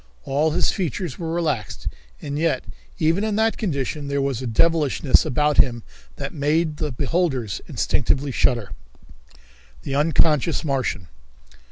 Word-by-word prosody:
All 145 +4 +1
his 155 - +2
features 175 -4 -3
were 165 -2 -3
relaxed, 150 - -2 0.4
and 145 +1 -3
yet 160 -6 +1 0.3
even 165 +6 +2
in 215 -1 0
that 220 +1 +2
condition 145 - -2
there 140 0 -1
was 135 -3 -1
a 130 - -3
devilishness 150 +2 +3
about 150 +3 +1
him 120 -3 +3 0.3
that 140 -1 -5
made 155 +1 0
the 150 -2 -2
beholders 135 - -1
instinctively 140 +1 0
shudder. 120 -5 +1 1.1
The - - -4
Unconscious 155 +1 +2
Martian. 130 - -1
145 Hz, 135 wpm, -23 LUFS, 135-165 Hz, 1.1 s, devilishness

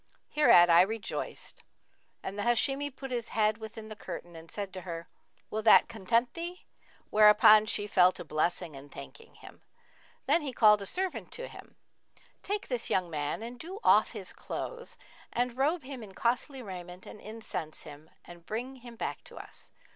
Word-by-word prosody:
Hereat 175 -13 +6
I 170 0 +7
rejoiced 215 +3 -2 0.6
and 195 - -5
the 205 - -3
Hashimi 270 +5 +1
put 270 -1 -9
his 240 -2 -2
head 215 0 +2
within 220 0 -8
the 215 - -8
curtain 175 -4 -8
and 165 0 -11
said 200 -2 -5
to 185 - -6
her, 170 -2 -6 0.4
'Will 220 - -1
that 220 - +7
content 230 +2 +1
thee?'; 345 +2 -6 0.5
whereupon 215 0 +7
she 205 - 0
fell 185 -3 +5
to - - -8
blessing 160 +1 -1
and 140 +1 -11
thanking 460 0 -11
him. - - -14 0.6
Then 340 - +3
he 280 -3 -4
called 210 -3 +6
a 200 - -4
servant 375 - -1
and - - -11
said - - -7
to - - -5
him, - - -13 0.7
'Take 410 0 -3
this 245 -3 -1
young 180 -2 0
man 150 +6 -2
and 240 +1 -8
do 370 +7 -7
off - - +5
his - - -6
clothes 485 -1 -6 0.3
and 245 0 -1
robe 295 +5 +1
him 260 -1 -7
in 195 -3 -11
costly 255 +3 -1
raiment 180 -2 -8
and - - -10
incense[FN#49] 215 -8 -6
him 150 +2 -12 0.2
and 175 -1 -13
bring 250 +5 -4
him 240 -1 -11
back - - -4
to - - -13
us.' - - -8
220 Hz, 185 wpm, -30 LUFS, 185-255 Hz, 0.7 s, I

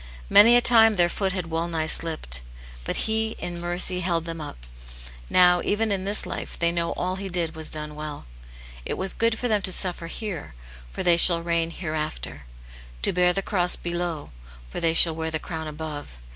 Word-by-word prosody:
Many 230 +4 +8
a 245 - +5
time 225 -3 +5
their 175 -2 +3
foot 190 +1 -1
had 180 -3 -5
well 165 +1 -2
nigh 160 -2 -2
slipped; 155 - -1 0.4
but - - -2
He, 220 0 -1
in 175 -1 -6
mercy, 175 +1 -1
held 170 -2 -2
them 165 -1 -6
up; - - -10 0.6
now, 180 -1 +4
even 220 +1 -1
in 190 -1 -2
this 205 +2 +4
life, - - -6
they 170 0 +1
know 170 -1 -1
all 185 +1 -3
he 195 0 -6
did 170 -3 -2
was 160 -1 0
done 150 -1 -2
well. 150 -1 -8 0.6
It - - -4
was 190 0 -2
good 230 0 0
for 245 - -2
them 215 -3 +1
to 190 - +1
suffer 180 -2 +4
hcrcy 195 - -7 0.4
for - - -5
they 175 -2 +4
shall 170 -1 +6
reign 170 -1 -1
hereafter 155 - -6 0.3
— - - -19
to - - +3
bear 180 0 +3
the 195 +2 -3
cross 180 -3 +1
below, 175 -3 -5 0.4
for - - -5
they 165 -1 +1
shall 165 -1 +6
wear 160 0 -4
the 160 - -2
crown 160 0 -7
^^^z;^. 155 -2 -6
175 Hz, 200 wpm, -24 LUFS, 160-190 Hz, 0.6 s, Many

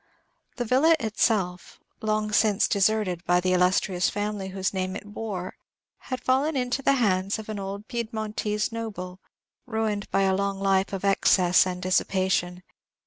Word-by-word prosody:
The 245 - -3
villa 275 +8 +4
itself, 205 -5 -1 0.2
long 215 -1 -1
since 210 -1 +3
deserted 200 -3 +1
by 175 0 +3
the 185 +1 +1
illustrious 180 0 +2
family 205 -1 -3
whose 190 0 -2
name 185 0 -2
it - - -7
bore, 205 -3 -5 0.6
had 255 -1 -4
fallen 275 +4 +1
into 250 +1 -1
the 275 - +3
hands 200 -6 +1
of 220 0 -9
an 215 -2 -4
old 200 +2 -6
Pied 235 -2 -3
montese 210 -1 -2
noble, 200 -5 -6 0.5
ruined 220 -3 -2
by 195 - +2
a 190 0 +2
long 200 0 -1
life 195 0 +1
of 195 0 -4
excess 185 -2 +4
and 180 0 -5
dissipation. 185 -1 0
200 Hz, 155 wpm, -26 LUFS, 185-220 Hz, 0.6 s, villa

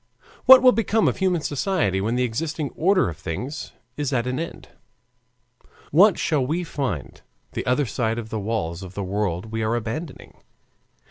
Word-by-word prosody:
What 260 0 +9
will 255 - +8
become 225 0 +1
of - - 0
human 185 -3 +1
society 145 - 0
when 110 +4 -1
the 125 - +1
existing 145 +5 -3
order 185 - +2
of 80 -3 -5
things 100 - -5 0.3
is 145 -2 -2
at 120 -3 0
an 125 +2 -2
end? 165 - -7 1.2
"What 190 +6 +6
shall 150 -5 +1
we 160 +7 -1
find 130 - -4 0.3
the - - -4
other 125 +3 +2
side 115 -1 -1
of 115 -2 -5
the 110 - -2
walls 100 -5 -3
of 95 -1 -10
the 100 - -3
world 95 0 -2
we 110 0 -2
are 110 +2 0
abandoning? 120 +7 -6
125 Hz, 175 wpm, -23 LUFS, 110-165 Hz, 1.2 s, What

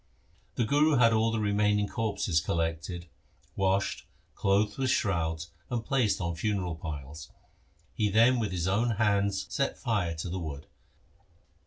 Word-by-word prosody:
The 120 - +1
Guru 145 +5 +3
had 115 -2 +5
all 110 +1 +3
the 115 - -1
remaining 105 0 +2
corpses 100 -7 0
collected, 80 +1 -2 0.5
washed, 95 0 0 0.3
clothed 105 +3 +1
with 130 -1 +1
shrouds, 85 -7 0 0.2
and 120 -3 -2
placed 130 -7 +1
on 85 -2 -2
funeral 90 0 -1
piles. 80 -1 -7 0.6
He 105 -1 +1
then 115 +5 +4
with 105 -4 -1
his 90 -1 -1
own 105 +6 +2
hands 100 -2 +1
set 140 - 0
fire 105 -9 -1
to 80 +3 -5
the 95 - -3
wood. 75 -3 -6
100 Hz, 145 wpm, -29 LUFS, 85-110 Hz, 0.6 s, had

